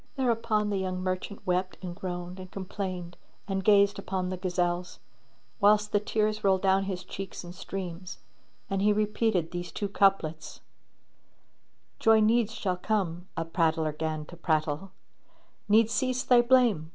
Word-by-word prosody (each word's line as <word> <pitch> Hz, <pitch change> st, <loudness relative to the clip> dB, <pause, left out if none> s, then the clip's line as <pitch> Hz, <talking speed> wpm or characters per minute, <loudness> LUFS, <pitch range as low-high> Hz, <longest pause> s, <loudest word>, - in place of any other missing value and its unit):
Thereupon 230 Hz, -5 st, +1 dB
the 200 Hz, -, 0 dB
young 185 Hz, -1 st, -2 dB
merchant 185 Hz, +2 st, -4 dB
wept 185 Hz, +1 st, 0 dB
and 175 Hz, -1 st, -5 dB
groaned 180 Hz, 0 st, -5 dB
and 185 Hz, 0 st, -9 dB
complained 185 Hz, -2 st, -5 dB, 0.3 s
and 190 Hz, -1 st, -2 dB
gazed 200 Hz, 0 st, +4 dB
upon 185 Hz, -2 st, -2 dB
the 185 Hz, -, -2 dB
gazelles; 180 Hz, -1 st, -1 dB, 0.6 s
whilst 210 Hz, 0 st, +4 dB
the 205 Hz, -, +3 dB
tears 215 Hz, 0 st, -1 dB
rolled 190 Hz, -1 st, +3 dB
down 195 Hz, 0 st, +3 dB
his 185 Hz, -2 st, -4 dB
cheeks 195 Hz, -1 st, -7 dB
in 175 Hz, 0 st, -9 dB
streams 180 Hz, -1 st, -6 dB, 0.5 s
and 195 Hz, 0 st, -1 dB
he 210 Hz, +1 st, +4 dB
repeated 210 Hz, -4 st, 0 dB
these 175 Hz, 0 st, -5 dB
two 205 Hz, -, -3 dB
couplets, 190 Hz, -6 st, +1 dB, 1.4 s
"Joy 225 Hz, 0 st, +5 dB
needs 225 Hz, 0 st, +3 dB
shall 185 Hz, -3 st, -1 dB
come," 180 Hz, -3 st, -2 dB
a 165 Hz, -, -1 dB
prattler 160 Hz, -2 st, +1 dB
'gan 155 Hz, 0 st, -3 dB
to 175 Hz, -, -12 dB
prattle: 155 Hz, +1 st, -1 dB, 0.4 s
* -, -, -37 dB
"Needs 220 Hz, +2 st, +4 dB
cease 255 Hz, -1 st, 0 dB
thy 245 Hz, -3 st, +6 dB
blame!" 240 Hz, -10 st, +3 dB
190 Hz, 150 wpm, -28 LUFS, 175-210 Hz, 1.4 s, thy